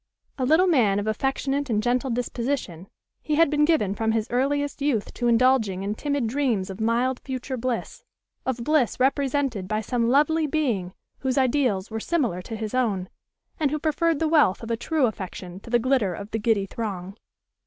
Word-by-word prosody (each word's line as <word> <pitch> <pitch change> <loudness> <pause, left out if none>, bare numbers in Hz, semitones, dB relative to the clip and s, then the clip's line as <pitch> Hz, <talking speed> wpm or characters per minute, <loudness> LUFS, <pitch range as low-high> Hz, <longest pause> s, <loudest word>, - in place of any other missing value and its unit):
A 255 - +1
little 320 +6 +5
man 240 - +3
of 205 - -1
affectionate 270 +5 -1
and 215 -2 +1
gentle 250 +3 +1
disposition, 235 - -3 0.3
he 305 - -1
had 325 -1 +4
been 295 0 +3
given 295 - +2
from 220 +1 0
his 220 -1 0
earliest 285 +3 0
youth 270 -8 0
to 240 - -1
indulging 230 -5 +3
in 200 +1 -1
timid 285 +2 -1
dreams 225 -6 0
of 190 +3 -8
mild 240 +3 +1
future 260 0 -5
bliss, 250 -1 -3 0.4
of 250 -2 -2
bliss 290 -4 +1
represented 270 -6 +1
by 215 +1 0
some 235 +1 0
lovely 300 +4 +3
being 240 - -1 0.2
whose 260 -1 -1
ideals 250 -7 +1
were 220 - -3
similar 240 - -1
to 225 - -7
his 220 0 -5
own, 205 -8 0 0.5
and 300 -3 +2
who 305 - -1
preferred 315 +1 +1
the 320 - 0
wealth 300 - +3
of 230 - -5
a - - +2
true 290 +4 +1
affection 185 -4 -5
to 215 - -13
the 240 - +4
glitter 235 -7 +1
of 200 +4 -8
the 225 - -1
giddy 210 -2 +1
throng. 195 -3 -5
245 Hz, 185 wpm, -25 LUFS, 215-285 Hz, 0.5 s, little